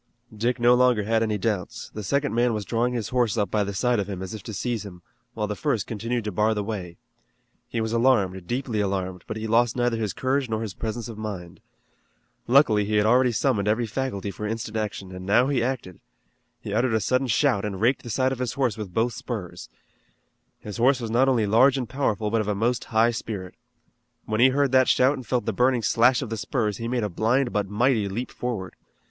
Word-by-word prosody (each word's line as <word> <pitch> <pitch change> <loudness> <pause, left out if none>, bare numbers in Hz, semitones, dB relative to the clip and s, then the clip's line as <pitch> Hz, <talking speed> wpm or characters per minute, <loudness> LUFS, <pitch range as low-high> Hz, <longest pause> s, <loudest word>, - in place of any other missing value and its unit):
Dick 120 +4 -1
no 120 +1 +5
longer 125 -3 +3
had 110 +2 +1
any 110 -2 0
doubts. 100 -3 -3
The 105 - -5
second 140 +8 0
man 120 0 +2
was 105 -2 -4
drawing 120 +3 0
his 115 -4 -3
horse 120 -3 +1
up 105 -2 0
by 105 -1 +2
the 100 - -3
side 125 +2 +1
of 100 0 -3
him, 95 -2 -5
as 95 - -6
if 110 - -7
to 110 - -8
seize 115 +1 -2
him, 90 -4 -11 0.3
while 105 -2 -1
the 105 0 -3
first 115 -6 -1
continued 115 +2 -3
to 105 - -3
bar 105 +4 +1
the 105 - -1
way. 95 -5 -5 0.7
He 115 - -2
was 110 0 -2
alarmed, 100 -7 +2
deeply 120 -3 -2
alarmed, 95 -2 -2
but - - -4
he 110 - -4
lost 115 +1 +2
neither 120 -2 +1
his 105 -5 -2
courage 130 0 -1
nor 110 0 -1
his 105 -4 -5
presence 110 +2 -4
of 110 -2 -8
mind. 95 -5 -6 0.9
Luckily 120 -5 +5
he 105 +1 -1
had 105 0 +3
already 125 +2 +4
summoned 110 -4 0
every 110 +3 +1
faculty 105 -4 -3
for 105 +2 -5
instant 110 0 -4
action, 105 -3 -4
and 90 - -7
now 115 +7 +3
he 135 -4 +1
acted. 120 -8 -3 0.6
He 105 - -5
uttered 120 +1 +2
a - - +3
sudden 130 +6 +1
shout, 105 -3 +2
and 100 -3 -4
raked 120 +5 +2
the 120 - -9
side 130 +3 +1
of 130 - -4
his 125 -3 -2
horse 125 -6 -1
with 95 -4 -7
both 115 +1 +1
spurs. 120 -8 -6 0.9
His 105 -2 -7
horse 130 +3 +3
was 115 -2 -4
not 130 +4 +3
only 120 -5 +2
large 125 +6 +4
and 125 -3 -3
powerful 110 -6 -1
but 115 -1 +2
of 105 - -4
a 105 - 0
most 120 +4 0
high 115 +1 +3
spirit. 105 -5 -5 0.7
When 110 0 -2
he 130 - +7
heard 140 0 +1
that 130 -1 +5
shout 130 +2 +4
and 130 -5 -8
felt 125 0 0
the 115 - -1
burning 125 +2 +2
slash 125 +4 +3
of 120 - -7
the 115 - -2
spurs 110 -2 -1
he 115 - -4
made 120 -1 -1
a - - +1
blind 120 +7 0
but 105 -2 -1
mighty 110 -1 +1
leap 120 +6 -4
forward. 110 -8 -4
115 Hz, 230 wpm, -25 LUFS, 105-125 Hz, 0.9 s, he